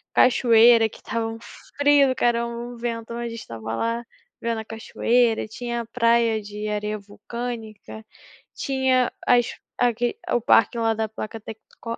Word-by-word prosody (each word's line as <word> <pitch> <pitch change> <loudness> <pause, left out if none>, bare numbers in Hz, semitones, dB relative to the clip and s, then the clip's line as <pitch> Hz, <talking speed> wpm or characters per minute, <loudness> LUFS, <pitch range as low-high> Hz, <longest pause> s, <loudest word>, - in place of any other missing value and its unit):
cachoeira, 230 -2 +6
que - - -14
estava 230 -1 -3
um 225 0 -6 0.4
frio 285 -1 +5
do 260 - 0
caramba, 235 -1 +1
um 240 +1 -7
vento, 230 -1 -4
mas 235 0 -4
a - - -4
gente 230 0 -7
estava 115 -1 -7
lá, 230 - -1 0.4
vendo 230 -1 -1
a - - -11
cachoeira, 225 +1 +1
tinha 235 +2 -4
a 230 - -8
praia 230 -1 +2
de 210 +1 -6
areia 210 0 -2
vulcânica, 220 +1 -7 0.5
tinha 260 -2 +1
as 240 -1 +4 0.3
aqui 245 - +1
o 240 - +2
parque 225 0 +4
lá 225 -1 +2
da 220 0 -2
placa 220 +1 -7
tecco 225 +1 -9
230 Hz, 160 wpm, -23 LUFS, 220-240 Hz, 0.5 s, cachoeira